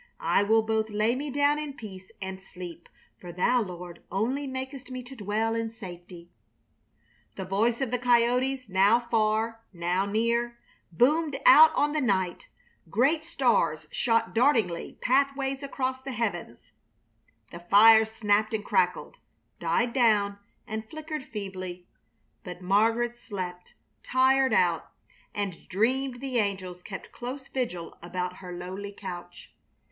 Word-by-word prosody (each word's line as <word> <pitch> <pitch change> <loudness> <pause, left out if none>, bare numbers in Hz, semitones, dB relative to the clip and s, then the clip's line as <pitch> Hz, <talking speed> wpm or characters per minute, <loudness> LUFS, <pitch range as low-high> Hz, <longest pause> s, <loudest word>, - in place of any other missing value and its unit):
I - - +4
will 220 +2 +3
both 220 0 0
lay 215 +2 +1
me 285 +3 -4
down 285 +2 +2
in 300 -2 -5
peace 190 -7 -10
and 190 -1 -6
sleep, 180 -3 -10 0.3
for 175 - -9
Thou 240 +8 +2
Lord 180 -3 -7
only 255 +8 -1
makest 260 0 -6
me 255 -1 -6
to 255 +2 -11
dwell 220 +1 -1
in 230 0 -2
safety...." 175 -5 -11 1.0
The 190 - -5
voice 225 +6 +1
of 260 -3 -1
the 250 - 0
coyotes, 250 +2 +2
now 200 +4 +4
far, 225 -1 0
now 180 +2 -1
near, 235 +3 0 0.3
boomed 290 - +2
out 315 +1 +9
on 295 - +2
the 305 - 0
night; 190 -7 0 0.4
great 275 - +2
stars 335 +1 +1
shot 230 -3 +1
dartling 225 -8 +1
pathways 275 +1 +1
across 260 -2 -3
the 270 0 -6
heavens; 200 - -4 0.8
the 170 - -8
fire 220 +5 +7
snapped 215 0 +1
and 210 - -4
crackled, 180 - 0 0.4
died 235 0 0
down 210 -5 +2 0.3
and 220 0 -6
flickered 310 -3 -6
feebly; 185 -4 -6 0.6
but 180 0 -8
Margaret 225 +6 +1
slept, 180 -5 -7 0.3
tired 260 +1 +3
out, - - +1 0.4
and 200 -4 -4
dreamed 245 +5 0
the 260 -3 -1
angels 190 -4 -2
kept 195 +1 -8
close 260 +3 -7
vigil 180 -11 -4
around 180 +1 -4
her 180 -2 -9
lowly 185 +3 -6
couch. 175 -2 -9
220 Hz, 135 wpm, -27 LUFS, 190-255 Hz, 1.0 s, out